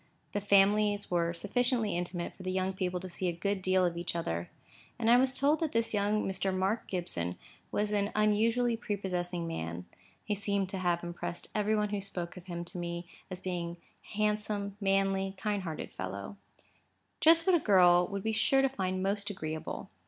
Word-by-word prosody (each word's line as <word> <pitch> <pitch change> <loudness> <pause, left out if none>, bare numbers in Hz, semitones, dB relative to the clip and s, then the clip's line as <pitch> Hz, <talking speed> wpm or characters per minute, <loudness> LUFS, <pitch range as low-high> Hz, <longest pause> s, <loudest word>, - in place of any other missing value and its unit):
The 205 - 0
families 205 +1 +3
were 170 -1 +2
sufficiently 225 +4 0
intimate 175 0 -3
for - - -14
the 185 0 -2
young 190 0 0
people 185 -1 -2
to 185 - -5
see 185 +1 -3
a - - +2
good 195 +3 -2
deal 185 0 +3
of 175 -1 0
each 170 0 -3
other: 85 - -2 0.5
and 230 -1 +3
I 240 - +8
was 260 +1 +4
told 290 +3 +3
that 320 -3 -1
this 230 0 +1
young 210 +1 +1
Mr. 190 0 0
Mark 190 +4 0
Gibson 90 - -2 0.3
was 210 0 0
an 205 0 +1
unusually 225 +3 +3
prepossessing 180 -6 -3
man 85 - -4 0.4
(he 210 - -1
seemed 200 -1 -1
to 190 - -2
have 175 -2 +1
impressed 175 0 -5
every 215 +1 +1
one 210 -1 +1
who 205 -1 -2
spoke 180 -3 -5
of 180 0 -11
him 175 -1 -4
to 180 +1 -7
me 170 0 -4 0.2
as 185 -1 -6
being 175 -2 -3 0.3
a 210 - -11
handsome, 210 -1 0
manly, 195 0 +1
kind 205 0 -1
hearted 165 -4 -5
fellow), 100 - -6 0.8
just 330 +1 +6
what 375 - +5
a - - +4
girl 180 - +5
would 200 0 -4
be 220 - 0
sure 270 +5 +3
to 270 - +4
find 185 -6 -2
most 200 +1 0
agreeable. 160 -5 -5
195 Hz, 190 wpm, -31 LUFS, 175-210 Hz, 0.8 s, I